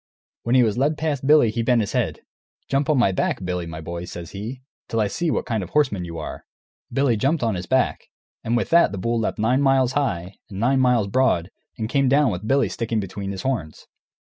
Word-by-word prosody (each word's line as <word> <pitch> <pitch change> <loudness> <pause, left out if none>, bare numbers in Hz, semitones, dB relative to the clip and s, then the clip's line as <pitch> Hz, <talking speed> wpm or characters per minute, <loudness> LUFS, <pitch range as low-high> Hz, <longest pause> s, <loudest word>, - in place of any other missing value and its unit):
When 120 +2 0
he 125 - +6
was 110 +1 0
led 150 +3 +1
past 145 -4 -2
Billy 150 -7 +6
he 115 +1 -2
bent 120 0 +3
his 100 - -3
head. - - -1 0.5
"Jump 135 +1 0
on 150 - +3
my 120 -6 +4
back, 95 0 -1
Billy, 90 -1 -3
my 80 -1 -7
boy," 85 +2 -6
says 85 -1 -8
he, 115 +6 -7 0.2
"till 115 - -2
I 110 - +3
see 165 - -1
what - - -1
kind 110 -3 -1
of 90 - -6
a - - -26
horseman 130 -12 +1
you 85 -1 -7
are!" 80 - -6 0.5
Billy 135 -4 +2
jumped 135 +6 0
on 115 -2 +1
his 90 -1 -5
back, 130 0 0 0.4
and 115 +1 +1
with - - -2
that 170 +1 +5
the 100 - -5
bull 115 +5 -1
leaped 110 - -2
nine 120 +5 +2
miles 135 -2 +3
high 95 -11 -2
and 95 -2 -7
nine 130 +4 +2
miles 125 -4 +3
broad 100 -5 +1 0.3
and 110 - -2
came 135 +2 +2
down 140 -2 +4
with 95 +3 -5
Billy 135 +2 +3
sticking 115 -1 -2
between 100 0 -5
his 95 -1 -6
horns. 115 - -3
115 Hz, 235 wpm, -23 LUFS, 95-135 Hz, 0.5 s, he